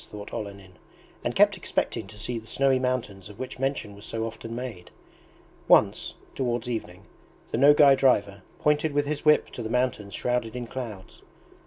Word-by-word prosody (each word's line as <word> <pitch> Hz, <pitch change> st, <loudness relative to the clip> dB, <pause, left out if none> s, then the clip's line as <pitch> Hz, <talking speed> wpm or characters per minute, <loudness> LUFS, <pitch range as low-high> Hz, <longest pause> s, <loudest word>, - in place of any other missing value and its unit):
thought 105 Hz, -1 st, -9 dB
Olenin, 100 Hz, -3 st, -7 dB, 0.4 s
and -, -, -2 dB
kept -, -, +5 dB
expecting 110 Hz, -, -2 dB
to 105 Hz, -, -12 dB
see 115 Hz, +2 st, -3 dB
the 110 Hz, -, -15 dB
snowy 135 Hz, 0 st, +2 dB
mountains 115 Hz, -7 st, -2 dB
of 105 Hz, -, -12 dB
which 130 Hz, 0 st, -6 dB
mention 135 Hz, -6 st, -2 dB
was 100 Hz, -, -13 dB
so 115 Hz, +1 st, -3 dB
often 115 Hz, 0 st, -7 dB
made. 120 Hz, -8 st, -6 dB, 0.8 s
Once, -, -, +4 dB, 0.2 s
towards 120 Hz, -3 st, -1 dB
evening, 100 Hz, -6 st, -5 dB, 0.5 s
the -, -, 0 dB
Nogay 145 Hz, 0 st, +7 dB
driver 100 Hz, -7 st, +2 dB, 0.2 s
pointed 150 Hz, 0 st, +1 dB
with 145 Hz, 0 st, +2 dB
his 150 Hz, +1 st, -3 dB
whip 150 Hz, 0 st, +4 dB
to -, -, -6 dB
the 110 Hz, -, -4 dB
mountains 115 Hz, -5 st, -1 dB
shrouded 125 Hz, -2 st, -1 dB
in 125 Hz, -1 st, -4 dB
clouds. 115 Hz, -6 st, -7 dB
120 Hz, 170 wpm, -26 LUFS, 105-130 Hz, 0.8 s, Nogay